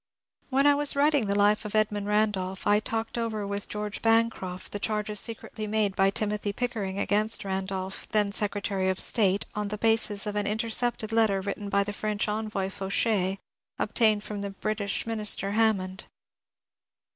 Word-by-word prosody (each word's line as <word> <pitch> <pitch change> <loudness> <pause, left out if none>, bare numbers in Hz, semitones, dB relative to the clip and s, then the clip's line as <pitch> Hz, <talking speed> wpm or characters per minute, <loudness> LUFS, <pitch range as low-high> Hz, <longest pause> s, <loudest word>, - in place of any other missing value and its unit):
When 275 +1 +2
I 290 - +7
was 290 0 +3
writing 285 -5 +3
the 200 - 0
Life 205 +1 +3
of 210 0 -6
Edmund 210 -1 +1
Randolph, 205 -3 0
I 205 0 +4
talked 225 +2 -3
over 220 -3 -2
with 200 0 -4
George 210 0 -4
Bancroft 225 -5 0
the 205 - -4
charges 210 0 -1
secretly 220 -1 -5
made 210 -2 0
by 195 0 +4
Timothy 210 0 -1
Pickering 210 -5 -3
against 210 +2 +1
Randolph, 190 0 -4
then 210 -2 +2
Secretary 200 -2 0
of 190 - -1
State, 200 -4 +3
on 210 -2 -2
the 210 +1 -4
basis 225 -2 +2
of 210 0 -3
an 205 -1 0
intercepted 225 +1 0
letter 220 -3 +3
written 200 +1 -4
by 200 0 +2
the 205 0 -5
French 210 0 -2
envoy, 210 -2 -2
Fauchet, 195 0 0 0.4
obtained 215 -3 +2
from 210 -1 -5
the 200 - -3
British 200 0 -2
Minister, 210 -3 0
Hammond. 205 -3 0
210 Hz, 165 wpm, -27 LUFS, 200-220 Hz, 0.4 s, I